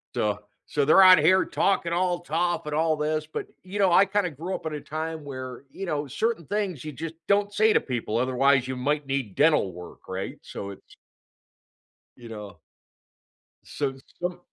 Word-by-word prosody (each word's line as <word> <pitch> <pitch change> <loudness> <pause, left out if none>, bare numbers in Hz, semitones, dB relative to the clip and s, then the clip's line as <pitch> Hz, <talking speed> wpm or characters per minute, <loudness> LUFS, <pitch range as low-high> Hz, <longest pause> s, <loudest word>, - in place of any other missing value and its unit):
So 105 -1 0 0.3
so 145 - +1
they're 155 +7 +6
out 185 -1 +9
here 185 +5 +4
talking 170 -4 +1
all 175 0 +1
tough 175 0 -1
and 150 0 -3
all 160 0 +2
this, 155 +1 -1
but, 155 - -5 0.2
you 190 +2 -6
know, 195 -2 +5
I 175 +3 +6
kinda 200 -1 0
grew 165 +6 -5
up - - -5
at 160 - -3
a 150 - -5
time 160 +1 -5
where, 130 -3 -7
you 195 - -6
know, 150 -4 -2
certain 220 - -1
things 200 -7 -2
you 155 - -5
just 160 +3 -6
don't 205 0 +2
say 215 +1 +4
to - - +4
people, 120 -4 -3
otherwise, 130 +1 +3
you 130 - -3
might 145 +3 -1
need 135 -7 -2
dental 150 - +3
work, 90 0 -12
right? 95 +1 -4
So 100 0 -7
it's 100 - -15 1.2
you 120 - -11
know. 105 -5 -9 1.1
So 140 -2 -3 0.3
some 180 0 -2
155 Hz, 185 wpm, -26 LUFS, 130-180 Hz, 1.2 s, out